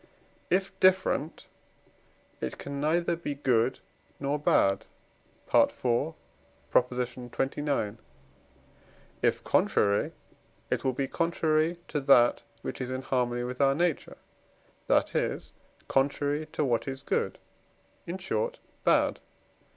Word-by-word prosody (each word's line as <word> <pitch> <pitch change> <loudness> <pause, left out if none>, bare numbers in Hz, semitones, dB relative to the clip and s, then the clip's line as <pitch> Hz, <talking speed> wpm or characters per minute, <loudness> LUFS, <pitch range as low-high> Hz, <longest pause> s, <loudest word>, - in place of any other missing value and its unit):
If 190 +1 +1
different, 185 -4 +2 0.9
it 65 - -4
can 140 0 -5
neither 170 +3 +2
be 160 -4 -4
good 125 -3 +1 0.4
nor 140 +1 -1
bad 95 -8 +2 0.7
(IV. 130 +6 +2 0.6
xxix.); 125 -1 0 1.2
if - - +1
contrary, 100 0 +2 0.6
it - - 0
will 130 - +1
be 135 +2 -1
contrary 165 +1 +1
to 150 - -1
that 130 -3 +5 0.2
which - - -5
is 125 - -3
in 130 +1 -3
harmony 120 -2 0
with 125 +2 -4
our 135 0 +4
nature, 170 -1 -1 0.7
that - - +3
is, - - -2 0.3
contrary 145 +2 +1
to 155 -1 -1
what 120 -1 0
is 135 0 -5
good - - -1 0.7
in 175 +2 -3
short, 485 - -2 0.3
bad. - - +3
140 Hz, 110 wpm, -29 LUFS, 125-155 Hz, 1.2 s, that